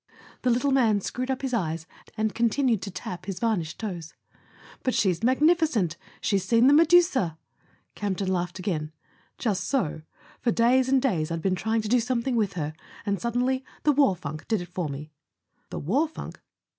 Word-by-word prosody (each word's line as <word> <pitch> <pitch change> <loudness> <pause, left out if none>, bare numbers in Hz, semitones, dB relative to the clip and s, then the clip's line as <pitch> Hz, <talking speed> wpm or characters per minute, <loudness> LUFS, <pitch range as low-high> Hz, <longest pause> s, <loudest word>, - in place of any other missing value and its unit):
The 255 - +1
little 250 +4 +2
man 230 -6 +4
screwed 255 +6 -4
up 265 0 -2
his 260 -2 -2
eyes 165 -7 -1 0.3
and 215 -1 0
continued 235 -1 +2
to 200 - -5
tap 180 0 -7
his 190 -2 -4
varnished 190 -9 -1
toes. 175 -7 -6 0.7
"But 255 - 0
she's 185 -5 +2
magnificent. 260 - +3 0.3
She's 195 -3 +1
seen 230 +5 +4
the 275 - +7
Medusa!" 315 - +4 0.6
Campton 195 -2 -1
laughed 175 0 -2
again. 165 -5 -2 0.5
"Just 195 -5 -1
so. 190 - -1 0.4
For 245 - 0
days 250 +3 +3
and 270 0 +4
days 170 - +1
I'd 165 -1 -3
been 190 - +2
trying 220 +4 0
to - - -3
do 245 +3 +4
something 245 +1 -1
with 210 -4 +1
her; 155 -3 -3 0.3
and 200 -2 -1
suddenly 250 +2 0 0.2
the 300 - +5
war 275 -9 +4
funk 155 -2 -7
did 220 -3 +1
it 175 -1 -7
for 180 -5 -2
me." 150 +2 -7 0.6
"The - - -5
war 265 - +1
funk 310 - -9
220 Hz, 180 wpm, -26 LUFS, 180-255 Hz, 0.7 s, the